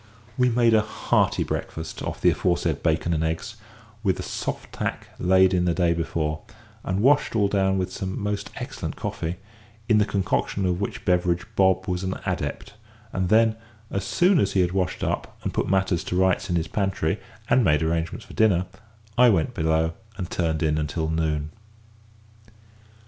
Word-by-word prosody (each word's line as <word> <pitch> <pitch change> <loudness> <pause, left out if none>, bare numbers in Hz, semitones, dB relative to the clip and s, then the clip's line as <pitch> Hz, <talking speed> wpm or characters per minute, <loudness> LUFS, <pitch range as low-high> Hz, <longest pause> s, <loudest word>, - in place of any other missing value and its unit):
We 125 0 +3
made 120 -1 +3
a 110 - +5
hearty - - +1
breakfast 80 0 -5
off - - -4
the - - +5
aforesaid 85 -4 0
bacon 85 +1 +1
and 80 -1 0
eggs, 80 0 -3 0.4
with - - 0
soft - - -4
tack - - -3
laid 95 +1 +4
in 90 -1 +2
the 85 -2 +1
day 85 -2 +3
before, 80 -2 -2 0.4
and 95 +2 -1
washed 140 -2 +4
all 105 -2 +3
down 95 -1 +1
with 90 -1 -2
some 95 0 -4
most 105 -1 -2
excellent - - -5
coffee, 80 +2 -3 0.5
in 110 -2 +4
the 105 - +4
concoction 100 0 -1
of 90 +1 0
which 100 - -4
beverage 90 0 +1
Bob 95 -1 +3
was 90 0 -1
an 95 0 -2
adept, - - -3 0.4
and 95 -2 -1
then, 110 +1 +4 0.3
as 95 - -2
soon 175 - +3
as 100 -4 +1
he 95 - +3
had 90 -1 +1
washed 90 -1 -1
up, - - -3
and - - -2
put - - -1
matters 95 -2 +1
to - - -3
rights 95 -1 +2
in 90 - +1
his 80 -1 0
pantry, 95 -5 -1 0.3
and 125 - +4
made 75 -4 +3
arrangements 80 +1 -2
for - - -13
dinner, 95 -5 +3 0.5
I 125 -1 +8
went 95 +2 +1
below 80 -3 +1 0.2
and 90 -3 -5
turned 80 -2 0
in 75 0 +1
until 80 +1 -2
noon. 75 -2 -1
90 Hz, 175 wpm, -25 LUFS, 80-100 Hz, 0.5 s, I